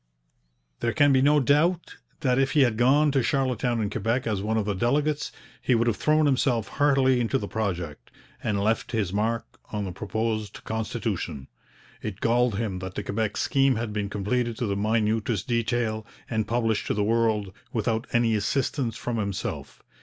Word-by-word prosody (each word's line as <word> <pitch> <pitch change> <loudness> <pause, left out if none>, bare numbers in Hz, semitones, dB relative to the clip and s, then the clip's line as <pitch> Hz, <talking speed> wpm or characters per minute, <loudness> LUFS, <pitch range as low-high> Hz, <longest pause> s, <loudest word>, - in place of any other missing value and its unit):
There 115 - 0
can 145 -2 +4
be 130 - +4
no 145 +2 +5
doubt 155 +6 +2 0.2
that 130 -3 +2
if 135 0 +1
he 150 - +5
had 120 -4 +3
gone 140 +6 +4
to 135 -1 +2
Charlottetown 125 -2 0
and 105 -2 -1
Quebec, 120 +3 -1
as 105 -4 -1
one 110 +2 0
of 110 - 0
the 105 - 0
delegates, 145 +8 0 0.3
he 125 - +2
would 115 +1 +2
have 115 -3 +2
thrown 155 +8 +2
himself 125 -5 +1
heartily 135 -3 +3
into 120 +3 +1
the 105 - -4
project, 90 - -3 0.3
and 105 -2 0
left 110 +3 0
his 100 -5 0
mark 115 +3 -2
on 105 -2 -2
the 95 - -4
proposed 110 +2 -3
constitution. 110 - -3 0.5
It 105 -3 -5
galled 120 -2 +2
him 100 -5 -2
that 95 0 -7
the 105 - -3
Quebec 105 +1 -2
scheme 135 -2 +2
had 110 -1 -3
been 105 -1 -2
completed 115 +3 -1
to 120 - -1
the 100 -2 -1
minutest 110 0 0
detail, 115 -2 0 0.2
and 110 -2 -1
published 115 -2 0
to - - 0
the 105 - +1
world, 110 -3 +1 0.2
without 110 +1 -1
any 120 -1 +3
assistance 115 +2 -1
from 120 -1 -3
himself. 100 -3 -4
115 Hz, 180 wpm, -26 LUFS, 105-125 Hz, 0.5 s, no